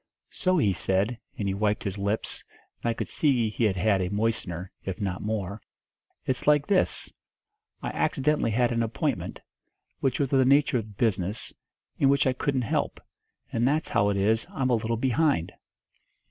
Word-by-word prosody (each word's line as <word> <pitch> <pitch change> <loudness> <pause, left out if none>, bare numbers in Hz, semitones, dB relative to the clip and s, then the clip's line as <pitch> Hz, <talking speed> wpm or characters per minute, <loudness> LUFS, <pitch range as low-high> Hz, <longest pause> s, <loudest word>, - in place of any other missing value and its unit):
So 185 0 +1
he 105 - +3
said, 95 +7 0 0.2
and 100 - -2
he 95 - 0
wiped 105 +1 0
his 100 0 -3
lips, 100 +2 -2 0.4
and 120 - 0
I - - +1
could - - -3
see 125 -8 +2
he 115 - 0
had 100 -3 +2
had 95 +1 +2
a 90 - -1
moistener, 100 -4 -2
if 95 -2 -4
not 95 -3 -2
more, 105 -1 -3 0.6
'It's 130 +1 -2
like 150 -1 +5
this 200 -2 +1 0.7
I - - -1
accidentally 150 -3 +1
had 120 +2 +2
an 115 0 +1
appointment, 115 0 -2 0.6
which 130 -2 0
was 140 -1 0
of 135 - +5
the - - +6
nature 140 +1 +4
of 105 -3 -9
business, 100 -2 0 0.5
and 135 - +5
which 140 0 +3
I 130 - +3
couldn't 130 0 0
help; 110 - -1 0.5
and 115 +2 +2
that's 150 +3 +1
how 100 - +3
it 100 - 0
is 110 +3 +2
I'm 130 -1 -1
a - - +4
little 115 0 0
behind!' 130 - +1
115 Hz, 180 wpm, -27 LUFS, 100-130 Hz, 0.7 s, the